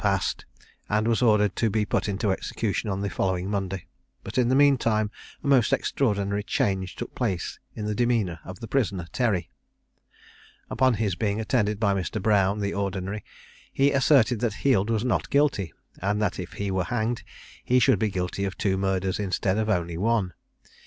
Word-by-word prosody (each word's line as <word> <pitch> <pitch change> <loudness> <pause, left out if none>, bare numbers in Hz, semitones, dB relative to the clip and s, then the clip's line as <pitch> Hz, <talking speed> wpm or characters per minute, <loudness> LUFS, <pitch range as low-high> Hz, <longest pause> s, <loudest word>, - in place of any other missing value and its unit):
_] - - -10
passed, - - 0 0.4
and 105 +1 +1
was 115 +1 +2
ordered 105 -5 +3
to 115 - +1
be 105 +1 0
put 105 - 0
into 100 +1 0
execution 110 +2 -2
on 95 0 -2
the 100 - -1
following 95 -1 -1
Monday; 95 -2 -3 0.4
but - - -8
in 120 -1 +3
the 130 - +3
mean 140 0 +6
time 110 -3 0 0.3
a - - -3
most 130 -5 +4
extraordinary 100 -5 0
change 95 -2 -1
took - - -6
place 100 -9 -2 0.2
in 105 - -4
the 105 - -1
demeanour 110 -7 0
of 90 0 -9
the 115 - -6
prisoner 105 -8 0
Terry. 105 -10 0 1.2
Upon 130 -2 +3
his 105 -3 0
being 100 +3 -1
attended 105 -1 0
by 100 -3 +2
Mr. 100 +2 -2
Brown, 100 0 +2
the 100 0 -1
Ordinary, 100 +1 -3 0.5
he 140 +1 +3
asserted 135 -4 +4
that 115 -3 -1
Heald 115 -6 +3
was 115 0 0
not 125 - 0
guilty, 140 - +2 0.3
and 100 +3 0
that 105 - -1
if 90 -1 -6
he 100 -1 -3
were 95 -2 0
hanged, 115 +2 -1 0.4
he 125 - +2
should 130 +1 +4
be 110 - +1
guilty 90 0 -3
of 95 -1 -3
two 95 -2 +1
murders 95 0 0
instead 100 0 0
of 110 0 -1
only 85 -4 -1
one. 105 -3 +1
105 Hz, 185 wpm, -26 LUFS, 95-115 Hz, 1.2 s, mean